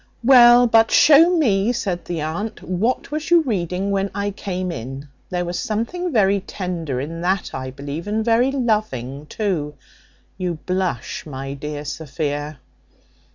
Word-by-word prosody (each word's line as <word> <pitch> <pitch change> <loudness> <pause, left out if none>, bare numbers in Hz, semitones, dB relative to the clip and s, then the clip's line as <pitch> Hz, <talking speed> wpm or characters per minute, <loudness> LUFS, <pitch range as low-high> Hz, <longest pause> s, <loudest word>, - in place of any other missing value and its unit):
"Well, 245 -1 +8
but 225 -1 +4
show 330 +4 +6
me," 215 -7 +2
said 190 -7 -3
the 170 -3 -3
aunt, 170 +8 -4
"what 215 +11 -1
was 305 +2 -3
you 345 -1 +6
reading 190 - -2
when 195 0 0
I 205 0 -1
came 185 -2 -4
in; 135 +3 -7 0.2
there 180 -1 -2
was 175 0 -3
something 335 +12 -2
very 200 -5 +3
tender 175 -8 -4
in 165 +5 -5
that, 185 +2 -1
I 130 0 -4
believe, 145 +6 -7
and 215 +1 -1
very 240 +3 +3
loving 180 - -2
too. 160 -9 -2 0.6
You 180 -2 -2
blush, 185 -8 -2
my 135 -1 -6
dear 150 +1 -6
Sophia. 145 0 -4
185 Hz, 150 wpm, -21 LUFS, 150-225 Hz, 0.6 s, Well